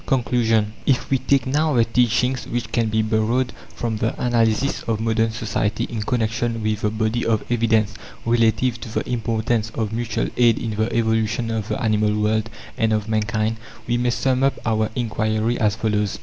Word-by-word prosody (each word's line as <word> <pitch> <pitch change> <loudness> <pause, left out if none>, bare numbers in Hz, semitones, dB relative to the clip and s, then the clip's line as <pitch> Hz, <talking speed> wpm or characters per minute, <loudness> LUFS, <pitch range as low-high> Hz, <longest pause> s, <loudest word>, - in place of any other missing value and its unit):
CONCLUSION 115 -4 +1
If 135 -1 +1
we 135 - +3
take 140 0 +2
now 150 +2 +1
the 115 -1 +4
teachings 125 +2 +1
which 120 -1 -3
can 115 -1 +1
be 110 0 +1
borrowed 110 +4 +1 0.2
from 115 -3 -2
the 110 +3 -2
analysis 120 +2 +1
of 110 -2 0
modern 115 0 +1
society, 110 0 -2
in 115 -2 -4
connection 115 0 -1
with 110 -1 -1
the 105 - +1
body 110 +2 -1
of 110 -2 +1
evidence 110 -3 +2 0.3
relative 115 +1 +2
to 115 - -7
the 110 - -3
importance 115 -1 -1
of 110 -2 -2
mutual 115 -2 -1
aid 120 -2 +5
in 115 -2 -3
the 110 +2 -1
evolution 115 0 0
of 110 -2 -2
the - - -2
animal 105 -2 +1
world 110 +1 +1 0.3
and 110 -1 +2
of 105 -1 -1
mankind, 110 0 0 0.3
we 120 - 0
may 120 0 +1
sum 130 +1 +1
up 135 0 +3
our 110 -1 +1
inquiry 110 0 0
as 105 -4 +2
follows. 105 -2 -1
115 Hz, 180 wpm, -22 LUFS, 110-120 Hz, 0.3 s, aid